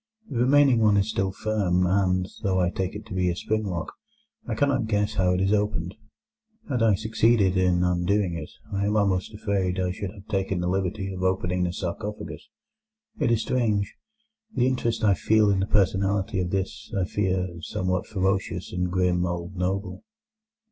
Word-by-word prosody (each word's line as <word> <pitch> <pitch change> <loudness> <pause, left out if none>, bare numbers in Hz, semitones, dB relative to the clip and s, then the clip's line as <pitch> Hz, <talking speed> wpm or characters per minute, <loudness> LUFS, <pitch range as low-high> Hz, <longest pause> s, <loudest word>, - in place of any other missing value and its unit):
The 120 - -1
remaining 135 0 +5
one 105 -2 +4
is 100 +2 +1
still 95 -1 0
firm, 95 -3 0
and, 95 0 +2
though 95 -1 +1
I 90 -1 +2
take 95 +1 -3
it 105 - -7
to - - -9
be 90 -1 +1
a 85 - -1
spring 110 +4 -1
lock, 85 -4 -4 0.5
I - - -2
cannot 140 -5 +1
guess 105 -1 0
how 90 -1 +2
it 90 - 0
is 95 +2 +2
opened. 100 -4 0 0.7
Had 125 -5 -1
I 110 -3 +5
succeeded 110 -2 +2
in 90 -1 +3
undoing 90 +2 +1
it, 80 -2 -6 0.2
I 100 +1 0
am 105 +1 +1
almost 95 -3 +1
afraid 100 -3 -1
I 90 -1 0
should 100 +1 -4
have 100 +1 -13
taken 95 -3 -1
the 90 - -1
liberty 95 +1 -1
of 90 - -6
opening 90 -1 0
the 90 - -1
sarcophagus. 95 +4 -5 0.7
It - - +2
is 115 -1 +2
strange, 105 -6 0 0.6
the 125 - +3
interest 120 -3 0
I 105 -2 +5
feel 105 +5 +3
in 95 - +1
the 95 - 0
personality 100 -1 +1
of 90 -1 -1
this, 95 +1 -3
I 90 - +1
fear, 90 -3 -1
somewhat 90 +2 -2
ferocious 95 -2 -1
and 90 0 -1
grim 90 -1 +2
old 85 +2 -4
noble." 95 - -2
95 Hz, 185 wpm, -25 LUFS, 90-105 Hz, 0.7 s, remaining